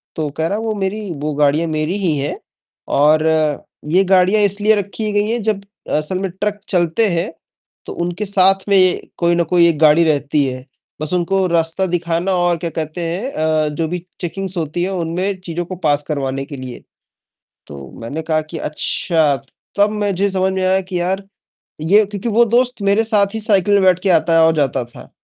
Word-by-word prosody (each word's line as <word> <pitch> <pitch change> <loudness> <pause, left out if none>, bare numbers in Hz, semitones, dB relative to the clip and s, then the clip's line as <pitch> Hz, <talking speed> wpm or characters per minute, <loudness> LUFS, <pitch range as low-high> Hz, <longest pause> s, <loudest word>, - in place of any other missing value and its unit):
तो 155 -2 -2
कह 160 - 0
रहा 205 - -1
"वो 225 -1 -2
मेरी 200 0 -3
वो 150 0 -2
गाड़ियाँ 150 +3 +2
मेरी 155 +4 -1
ही 155 -4 +1
हैं, 140 +1 -3 0.5
और 155 +2 +3 0.7
ये 185 +3 +4
गाड़ियाँ 190 +3 +4
इसलिए 205 +2 +3
रखी 210 +2 -3
गई 205 +1 +1
हैं 235 - -1
जब 210 -2 0 0.4
असल 155 +5 -1
में 195 0 -2
ट्रक 205 +2 -3
चलते 175 +4 +2
हैं 170 -1 -1 0.5
तो - - -6
उनके 175 +4 -3
साथ 195 0 +3
में 185 -2 +4 0.2
कोई 170 0 +2
ना 170 - +2
कोई 170 +1 +3
एक 155 -3 -2
गाड़ी 155 +1 +5
रहती 145 -1 +1
है। 130 0 -5 0.4
बस 155 +3 -3
उनको 185 +2 +1
रास्ता 165 +2 +1
दिखाना 170 +1 -1
और 175 -1 +1
क्या 170 +1 -4
कहते 160 +1 -5
हैं 180 +11 -3
अ, 155 -1 0
जो 160 +2 -2
भी 175 +1 -5 0.2
चेकिंग्स 190 +1 -4
होती 165 +1 -2
है 190 - -1
उनमें 185 +3 -2
चीज़ों 175 -1 -4
को 185 - -6
पास 145 0 +1
करवाने 135 -2 -2
के 145 - -9
लिए।" 130 -2 -8 0.8
तो 70 -2 -10
मैंने 140 +8 -5
कहा 155 -1 0
कि 155 +2 -8
"अच्छा!" 155 0 0 0.4
तब 205 +1 +5
मुझे 200 0 0
समझ 190 0 0
में 190 0 -1
आया 190 +1 +2
कि 185 -1 -4
यार 190 +2 -1 0.6
ये 200 +7 +4
क्योंकि 205 +2 -5
वो 230 +2 +4
दोस्त 245 +1 +1
मेरे 200 +2 +3
साथ 210 -2 +2
ही 220 - -2
साइकिल 205 -2 +3
में 200 - +4
बैठ 185 -1 +4
के 195 - +1
आता 165 -1 +3
है - - +6
और 160 - +3
जाता 135 -4 0
था। 120 - -14
175 Hz, 195 wpm, -18 LUFS, 155-195 Hz, 0.8 s, है